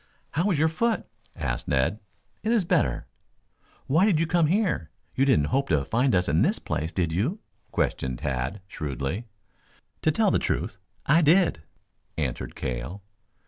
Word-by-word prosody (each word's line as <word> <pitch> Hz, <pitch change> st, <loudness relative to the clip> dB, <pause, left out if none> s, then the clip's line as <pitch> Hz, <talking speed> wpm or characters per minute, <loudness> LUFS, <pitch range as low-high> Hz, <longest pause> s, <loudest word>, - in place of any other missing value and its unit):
"How 175 Hz, +7 st, +1 dB
is 180 Hz, -, +2 dB
your 155 Hz, +2 st, +4 dB
foot?" 220 Hz, +8 st, 0 dB, 0.3 s
asked 60 Hz, -7 st, -3 dB
Ned. 75 Hz, +9 st, +1 dB, 0.4 s
"It 220 Hz, -, 0 dB
is 225 Hz, -6 st, +3 dB
better." 65 Hz, -, +1 dB, 0.8 s
"Why 160 Hz, +7 st, +3 dB
did 175 Hz, -8 st, +3 dB
you 165 Hz, -, +2 dB
come 165 Hz, -1 st, +3 dB
here? 180 Hz, -, +1 dB, 0.2 s
You 135 Hz, -, +2 dB
didn't 75 Hz, -, +3 dB
hope 135 Hz, +1 st, +1 dB
to 70 Hz, -3 st, +2 dB
find 120 Hz, -, +2 dB
us 90 Hz, 0 st, +2 dB
in 75 Hz, +3 st, +2 dB
this -, -, +3 dB
place, 80 Hz, +3 st, -3 dB
did 85 Hz, -4 st, -1 dB
you!" 120 Hz, -, 0 dB, 0.3 s
questioned 65 Hz, -2 st, -1 dB
Tad 65 Hz, +11 st, -3 dB
shrewdly. 75 Hz, -, -4 dB, 0.7 s
"To -, -, +3 dB
tell -, -, +2 dB
the -, -, +3 dB
truth, 100 Hz, -, -2 dB, 0.3 s
I 155 Hz, +5 st, +5 dB
did," 165 Hz, -, +4 dB, 0.6 s
answered 70 Hz, -6 st, -3 dB
Cale. 65 Hz, +10 st, -4 dB
100 Hz, 160 wpm, -26 LUFS, -, 0.8 s, I